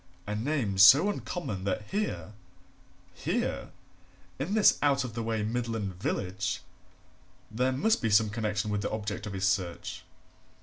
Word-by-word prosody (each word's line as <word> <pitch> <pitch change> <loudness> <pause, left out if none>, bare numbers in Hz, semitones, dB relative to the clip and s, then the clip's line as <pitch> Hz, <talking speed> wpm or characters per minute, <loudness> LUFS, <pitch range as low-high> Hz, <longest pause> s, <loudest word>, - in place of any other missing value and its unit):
A 105 - -3
name 110 -4 -1
so 140 - +8
uncommon 165 - -5
that 100 +2 -1
here 205 - -2 0.8
here, - - -2 0.7
in 170 +10 -1
this 215 - +5
out 140 -2 +3
of 125 -3 -6
the 115 - -3
way 110 -1 -1
Midland 115 -3 -2
village! 95 -1 -2 0.9
there 125 +4 +1
must 190 - +1
be 115 - +1
some 105 0 +4
connection 105 -1 -2
with 105 -1 -1
the - - -2
object 105 -1 -4
of 100 - -6
his 95 -1 0
search. 90 -2 -2
110 Hz, 145 wpm, -29 LUFS, 100-130 Hz, 0.9 s, so